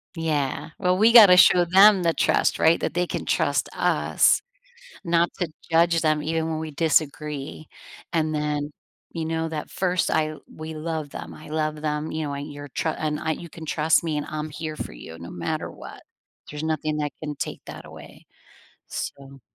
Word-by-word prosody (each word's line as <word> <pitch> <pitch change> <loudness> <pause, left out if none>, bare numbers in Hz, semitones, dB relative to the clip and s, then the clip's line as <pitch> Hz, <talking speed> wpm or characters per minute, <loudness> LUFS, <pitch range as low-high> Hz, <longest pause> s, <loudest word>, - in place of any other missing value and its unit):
Yeah, 155 -4 -2
well, 180 -1 +2
we 220 +4 +5
gotta 210 -6 +9
show 180 -1 +7
them 190 +2 +6
the 165 -1 +2
trust, - - +1
right, 160 +1 +4
that - - -2
they 175 0 0
can - - -4
trust - - +1
us, - - +3 0.6
not 170 -1 +2
to 175 -3 -1 0.2
judge 165 0 +4
them 155 -1 +2
even 160 +1 -1
when 160 - -2
we 160 0 -5
disagree, 150 -1 -1 0.4
and 155 -2 0
then, 150 -1 -2 0.4
you 165 -1 -3
know, 160 0 -2
that 155 -2 -5
1st, 180 -2 0
I 155 0 0
we 155 0 -8
love 155 -1 -4
them, - - -8
I 155 - -12
love 155 0 -2
them, 150 0 -2
you 155 0 -2
know, 140 - -4
and 145 +1 -6
your 145 0 -9
tr 150 - -2
and 155 -1 -2
I 160 - -1
you 170 +2 -7
can 165 0 -10
trust 160 +1 +2
me, 155 -3 -1
and 150 - -4
I'm 155 0 -4
here 155 +1 -6
for - - -6
you 80 +7 -11
no 85 - -9
matter 85 -1 -3
what. - - -11 0.5
There's 150 0 -6
nothing 155 -1 -1
that 150 -1 -2
can 150 -1 -4
take - - -5
that - - -10
away, - - -13 0.6
so 140 0 -7
155 Hz, 190 wpm, -24 LUFS, 150-165 Hz, 0.6 s, gotta